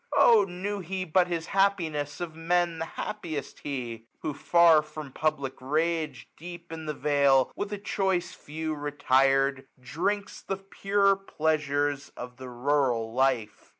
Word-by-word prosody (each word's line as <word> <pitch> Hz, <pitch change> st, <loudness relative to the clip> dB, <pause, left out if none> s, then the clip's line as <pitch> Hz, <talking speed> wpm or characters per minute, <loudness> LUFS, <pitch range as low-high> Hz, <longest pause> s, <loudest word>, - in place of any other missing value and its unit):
Oh 225 Hz, -4 st, +7 dB
knew 195 Hz, +3 st, -4 dB
he 185 Hz, +1 st, -4 dB
but 180 Hz, +2 st, +3 dB
his 170 Hz, -2 st, -2 dB
happiness, 160 Hz, -7 st, +1 dB
of 175 Hz, -2 st, -4 dB
Men 170 Hz, +1 st, 0 dB
The 165 Hz, -, -2 dB
happiest 165 Hz, -8 st, -5 dB
he! 120 Hz, -5 st, -5 dB, 0.2 s
who 155 Hz, -, -2 dB
far 170 Hz, +1 st, +5 dB
from 150 Hz, -2 st, -9 dB
public 145 Hz, -2 st, -1 dB
rage. 155 Hz, 0 st, -1 dB
Deep 175 Hz, 0 st, -10 dB
in 160 Hz, -1 st, -6 dB
the 150 Hz, -, -2 dB
vale, 140 Hz, -2 st, +3 dB
with 205 Hz, 0 st, -4 dB
a 205 Hz, -, -2 dB
choice 190 Hz, -3 st, -1 dB
Few 155 Hz, +1 st, -5 dB
retired, 135 Hz, -2 st, +2 dB
^235 -, -, -26 dB
Drinks 200 Hz, +9 st, -2 dB
the 195 Hz, -, -3 dB
pure 195 Hz, +1 st, +2 dB
pleasures 145 Hz, -6 st, -1 dB
of 125 Hz, 0 st, -8 dB
the 130 Hz, -1 st, -8 dB
Rural 125 Hz, -3 st, 0 dB
Life. 125 Hz, -5 st, 0 dB
155 Hz, 150 wpm, -28 LUFS, 135-175 Hz, 0.2 s, Oh